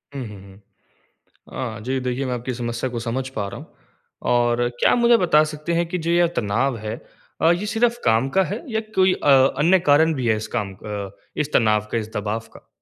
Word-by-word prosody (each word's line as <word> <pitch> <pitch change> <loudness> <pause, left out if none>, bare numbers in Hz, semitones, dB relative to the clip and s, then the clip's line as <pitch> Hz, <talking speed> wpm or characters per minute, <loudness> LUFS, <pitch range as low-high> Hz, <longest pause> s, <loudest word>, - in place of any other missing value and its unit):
हुँ, 140 - -4
हुँ, 105 -2 -10
हुँ। 95 +1 -16 1.2
अ, - - -9
जी, 130 +2 -1
देखिए 125 +1 -2
मैं 125 - -2
आपकी 125 +1 -4
समस्या 120 +1 -3
को 120 -1 -4
समझ 125 +3 -3
पा 105 -6 -4
रहा 100 - -8
हूँ। - - -14 0.6
और 120 0 +2
क्या - - +4
आप - - +3
मुझे 235 -1 +5
बता 155 -5 +4
सकते 155 +2 -4
हैं 170 +1 +1
कि 180 - -3
जो 170 - +1
यह 175 0 +4
तनाव 120 +5 0
है, 110 0 -5 0.5
अ, 165 - +5
ये 175 +4 -1
सिर्फ़ 235 +1 +2
काम 115 +4 +3
का 190 - +6
है 205 +6 -5
या 220 - +2 0.2
कोई 185 0 +4
अ, 145 - -1 0.3
अन्य 170 +6 +4
कारण 160 0 +4
भी 130 -5 -2
है 110 - +3
इस 110 - -5
काम 100 -4 -3
अ, 100 0 -6 0.3
इस 150 0 -2
तनाव 105 -2 +2
का - - 0
इस 110 -1 -4
दबाव 105 +1 -2
का? - - -16
130 Hz, 225 wpm, -22 LUFS, 110-165 Hz, 1.2 s, का